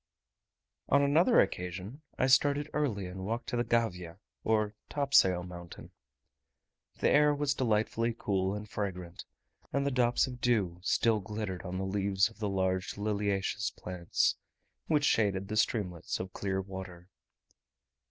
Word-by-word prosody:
On 140 Hz, +1 st, +5 dB
another 165 Hz, -, +4 dB
occasion 90 Hz, -, -2 dB, 0.2 s
I -, -, +2 dB
started 145 Hz, +2 st, +3 dB
early 120 Hz, -11 st, -1 dB
and 90 Hz, +1 st, -7 dB
walked 115 Hz, +4 st, -3 dB
to 125 Hz, -, -2 dB
the 120 Hz, -, +1 dB
Gavia, 90 Hz, -9 st, -1 dB, 0.3 s
or 110 Hz, -1 st, +1 dB, 0.2 s
topsail 135 Hz, -11 st, +3 dB
mountain. 85 Hz, -1 st, -10 dB, 1.1 s
The -, -, +2 dB
air 150 Hz, 0 st, +5 dB
was 145 Hz, -1 st, +1 dB
delightfully 115 Hz, -2 st, 0 dB
cool 95 Hz, -2 st, 0 dB
and 105 Hz, +1 st, -6 dB
fragrant; 90 Hz, -5 st, -5 dB, 0.5 s
and 140 Hz, 0 st, 0 dB
the 140 Hz, -, +1 dB
drops 125 Hz, -1 st, +3 dB
of 125 Hz, -1 st, -8 dB
dew 100 Hz, -8 st, +1 dB
still 110 Hz, +3 st, +2 dB
glittered 105 Hz, -2 st, -5 dB
on 90 Hz, 0 st, -5 dB
the 95 Hz, -, -2 dB
leaves 100 Hz, +1 st, +1 dB
of 110 Hz, -, -20 dB
the 105 Hz, -2 st, -1 dB
large 95 Hz, -1 st, -1 dB
liliaceous 100 Hz, -1 st, -1 dB
plants, 90 Hz, -1 st, -1 dB, 0.5 s
which 150 Hz, -2 st, +2 dB
shaded 100 Hz, -5 st, +2 dB
the 110 Hz, -, -2 dB
streamlets 100 Hz, -6 st, -1 dB
of 95 Hz, 0 st, -6 dB
clear 95 Hz, -1 st, -2 dB
water. 95 Hz, -2 st, -8 dB
105 Hz, 145 wpm, -31 LUFS, 95-120 Hz, 1.1 s, On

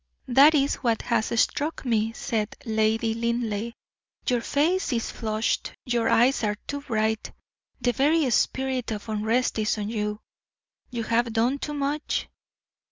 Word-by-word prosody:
"That 275 Hz, +5 st, +7 dB
is 280 Hz, -1 st, +2 dB
what 230 Hz, -4 st, 0 dB
has 230 Hz, -2 st, +1 dB
struck 295 Hz, +4 st, 0 dB
me," 225 Hz, -2 st, +1 dB
said 220 Hz, -2 st, -2 dB
Lady 220 Hz, 0 st, +1 dB
Linleigh. 230 Hz, -1 st, -2 dB, 0.5 s
"Your 245 Hz, -2 st, +2 dB
face 310 Hz, +7 st, +1 dB
is 230 Hz, -1 st, -1 dB
flushed, 220 Hz, -1 st, -1 dB
your 240 Hz, -2 st, +1 dB
eyes 245 Hz, +2 st, +3 dB
are 210 Hz, -1 st, +1 dB
too 285 Hz, 0 st, -4 dB
bright; 220 Hz, -4 st, -1 dB, 0.5 s
the 245 Hz, -, +2 dB
very 290 Hz, +4 st, +2 dB
spirit 260 Hz, +2 st, 0 dB
of 215 Hz, 0 st, -5 dB
unrest 220 Hz, +3 st, 0 dB
is 215 Hz, +1 st, +1 dB
on 210 Hz, 0 st, -3 dB
you. 210 Hz, -1 st, -2 dB, 0.7 s
You 235 Hz, -2 st, -3 dB
have 230 Hz, +1 st, +1 dB
done 240 Hz, +5 st, +1 dB
too 295 Hz, +1 st, -4 dB
much. 285 Hz, +2 st, -1 dB
235 Hz, 145 wpm, -26 LUFS, 220-265 Hz, 0.7 s, That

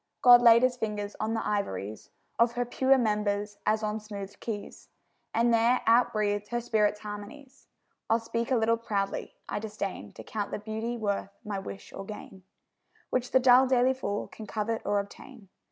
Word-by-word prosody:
God 245 Hz, -1 st, +9 dB
laid 235 Hz, 0 st, +7 dB
His 255 Hz, -1 st, +2 dB
fingers 210 Hz, -3 st, -3 dB
on 220 Hz, +1 st, -1 dB
the 225 Hz, -, -2 dB
ivories 110 Hz, -, -3 dB, 0.3 s
Of 235 Hz, 0 st, +4 dB
her 245 Hz, 0 st, -1 dB
pure 265 Hz, +2 st, +3 dB
members 210 Hz, -3 st, -1 dB
as 215 Hz, +1 st, +2 dB
on 215 Hz, +1 st, -1 dB
smoothèd 200 Hz, -2 st, -8 dB
keys, 210 Hz, -3 st, -7 dB, 0.4 s
And 235 Hz, +1 st, +2 dB
there 230 Hz, +2 st, +3 dB
out 240 Hz, +1 st, +4 dB
breathed 205 Hz, -2 st, -1 dB
her 240 Hz, +2 st, -2 dB
spirit's 210 Hz, -3 st, +1 dB
harmonies. 235 Hz, +7 st, -9 dB, 0.4 s
I'll 225 Hz, -, +4 dB
speak 230 Hz, +1 st, -3 dB
a 260 Hz, -, +3 dB
little 230 Hz, +1 st, +2 dB
proudly: 200 Hz, -3 st, -3 dB
I -, -, -3 dB
disdain 205 Hz, -, -5 dB
To -, -, -10 dB
count 205 Hz, -2 st, -4 dB
the -, -, -3 dB
beauty 220 Hz, +3 st, -4 dB
worth 205 Hz, -3 st, -2 dB, 0.2 s
my 205 Hz, -2 st, -3 dB
wish 195 Hz, 0 st, -9 dB
or -, -, -6 dB
gain, 195 Hz, -2 st, -10 dB, 0.7 s
Which 255 Hz, 0 st, 0 dB
the 260 Hz, -, +4 dB
dull 255 Hz, +1 st, +6 dB
daily 255 Hz, 0 st, +3 dB
fool 205 Hz, -6 st, -3 dB
can 220 Hz, -, -10 dB
covet 220 Hz, +2 st, -2 dB
or 205 Hz, 0 st, +2 dB
obtain. 200 Hz, +1 st, -10 dB
220 Hz, 180 wpm, -28 LUFS, 205-240 Hz, 0.7 s, God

